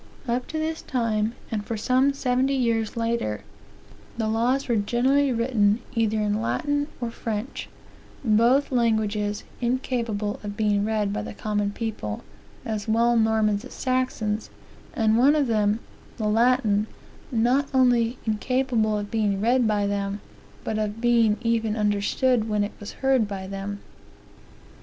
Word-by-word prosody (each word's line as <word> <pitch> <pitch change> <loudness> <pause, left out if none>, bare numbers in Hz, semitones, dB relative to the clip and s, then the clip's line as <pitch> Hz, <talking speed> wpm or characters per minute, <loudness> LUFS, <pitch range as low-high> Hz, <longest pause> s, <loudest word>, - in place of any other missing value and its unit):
Up 245 +1 -1
to 315 - -4
this 315 +1 -2
time, 225 -3 -1 0.2
and 215 -2 -2
for 225 +1 -4
some 255 +5 +3
seventy 265 0 +1
years 230 -3 0
later, 230 - -1 0.7
the 225 -2 0
laws 240 +5 +1
were 240 - +1
generally 260 +6 +2
written 230 -4 +2 0.2
either 220 -2 +1
in 210 0 0
Latin 290 +4 0
or 240 -2 -3
French; 225 +2 -5 0.6
both 235 +6 +3
languages 215 -4 0 0.2
incapable 235 -4 -1
of 205 0 -6
being 205 -2 +2
read 210 -2 0
by - - -2
the - - -7
common 205 -1 -1
people, 205 - -4 0.4
as 215 -3 -3
well 235 +2 +3
Normans 220 -2 +2
as - - -10
Saxons; 255 -5 -1 0.5
and 220 0 +3
one 280 +4 +5
of 295 -2 +2
them, 215 -2 +1 0.4
the 215 - -1
Latin, 220 -2 +3 0.4
not 250 +4 +2
only 245 -2 +3
incapable 225 -1 +1
of 205 0 -5
being 210 -3 +1
read 240 +3 +3
by 205 -1 +1
them, 200 0 -2 0.4
but 215 - -2
of 210 +1 -2
beingeven 230 -1 +2
understood 215 +3 +1
when 210 -1 +1
it 205 - -4
was 205 - -7
heard 265 -5 +3
by 195 -2 -5
them. 195 +1 -5
225 Hz, 145 wpm, -25 LUFS, 210-245 Hz, 0.7 s, one